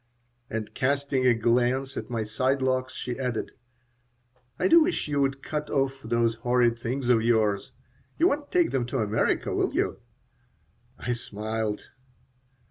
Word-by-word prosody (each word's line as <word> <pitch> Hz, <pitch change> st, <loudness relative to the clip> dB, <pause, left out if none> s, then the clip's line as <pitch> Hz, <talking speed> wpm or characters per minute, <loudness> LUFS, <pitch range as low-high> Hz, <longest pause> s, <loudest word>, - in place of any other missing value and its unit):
And 110 Hz, -1 st, -4 dB
casting 140 Hz, -1 st, +1 dB
a 120 Hz, -, +5 dB
glance 125 Hz, +4 st, +1 dB
at -, -, -5 dB
my 115 Hz, -2 st, -1 dB
side 130 Hz, +5 st, 0 dB
locks, 130 Hz, 0 st, 0 dB
she 125 Hz, +1 st, -4 dB
added: 125 Hz, -4 st, -2 dB, 1.1 s
"I -, -, +2 dB
do 335 Hz, 0 st, +7 dB
wish 345 Hz, -, 0 dB
you 145 Hz, -1 st, 0 dB
would 135 Hz, 0 st, 0 dB
cut 150 Hz, -1 st, -3 dB
off 135 Hz, -1 st, 0 dB
those 115 Hz, 0 st, +1 dB
horrid 120 Hz, -1 st, +2 dB
things 125 Hz, +2 st, -3 dB
of 115 Hz, -2 st, +5 dB
yours. 110 Hz, -3 st, +1 dB, 0.5 s
You 335 Hz, -, +5 dB
won't 290 Hz, 0 st, -3 dB
take 355 Hz, -2 st, +3 dB
them 125 Hz, -3 st, 0 dB
to 135 Hz, -, -2 dB
America, 110 Hz, -2 st, 0 dB
will -, -, 0 dB
you?" -, -, 0 dB, 1.0 s
I 120 Hz, -, -2 dB
smiled. 110 Hz, -1 st, -3 dB
125 Hz, 150 wpm, -27 LUFS, 115-135 Hz, 1.1 s, do